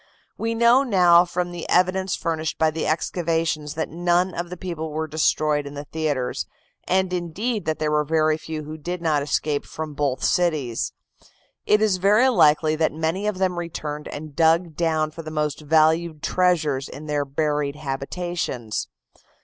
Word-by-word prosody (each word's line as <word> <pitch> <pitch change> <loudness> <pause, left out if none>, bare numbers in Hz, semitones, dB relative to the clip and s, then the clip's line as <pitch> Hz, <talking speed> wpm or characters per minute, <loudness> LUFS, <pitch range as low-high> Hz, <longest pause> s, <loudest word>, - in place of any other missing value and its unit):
We 230 0 -2
now 235 +3 +5
know 180 -8 +5
from 175 0 -2
the 175 -1 -7
evidence 185 +1 +2
furnished 160 -2 -2
by 160 -1 +3
the 160 0 -3
excavations 160 -2 -1
that 160 - -2
none 175 +2 +1
of 175 0 -4
the 180 - -7
people 165 -3 -5
were 160 +1 -2
destroyed 150 -1 +1
in 140 - -9
the 145 - -5
theatres, 145 -4 -2 0.4
and, 185 0 +1
indeed, 195 +6 -2
that 155 - -1
there 155 0 -1
were 150 0 +2
very 155 0 +2
few 155 0 -6
who 155 +1 -8
did 175 +4 -4
not 155 -3 +1
escape 145 0 -1
from 155 -1 -6
both 140 -3 -1
cities. 155 -10 0 0.8
It 210 +1 +4
is 205 -4 +2
very 210 +7 +4
likely 155 -8 +4
that 160 0 +2
many 160 +6 -2
of 210 -3 -1
them 185 -2 0
returned 150 -3 -5
and 150 -1 -8
dug 165 +1 +3
down 155 -2 0
for 165 - -8
the 155 - -7
most 150 -1 -2
valued 160 +1 +2
treasures 155 -7 +1
in 150 - -9
their 150 -1 0
buried 145 0 -1
habitations. 135 - -3
160 Hz, 170 wpm, -23 LUFS, 150-175 Hz, 0.8 s, now